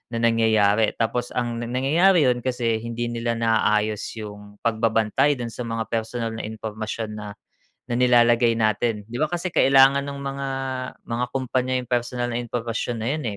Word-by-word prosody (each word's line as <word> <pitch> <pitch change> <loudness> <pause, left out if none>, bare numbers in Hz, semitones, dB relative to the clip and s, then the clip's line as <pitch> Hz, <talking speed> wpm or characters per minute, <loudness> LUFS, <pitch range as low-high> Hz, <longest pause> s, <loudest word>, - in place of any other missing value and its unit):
na - - 0
nangyayari 110 -2 +3
tapos 120 +2 -2
ang 120 -1 -1
nangyayari 145 +9 +3
'yun 125 - +1
kasi 120 -3 0
hindi 115 +1 -4
nila 115 0 -2
naaayos 110 -2 +1 0.2
yung 105 0 -10
pagbabantay 115 +4 +2
do'n 120 -2 -5
sa 125 - -6
mga 115 0 -2
personal 115 0 -2
na - - -5
impormasyon 110 0 -5
na, 105 - -7 0.6
na 120 - -3
nilalagay 120 -1 +4
natin. 110 -1 0
'Di 120 - -9
ba 155 - +2
kasi 175 +1 -2
kailangan 135 +1 +5
ng 140 0 -6
mga, 140 0 -4 0.6
mga 120 +1 -1
kumpanya 130 0 -1
yung 125 - -8
personal 120 0 -1
na 120 - -1
impormasyon 120 0 -3
na 110 - -3
'yun, 155 - -5
115 Hz, 160 wpm, -23 LUFS, 110-125 Hz, 0.6 s, kailangan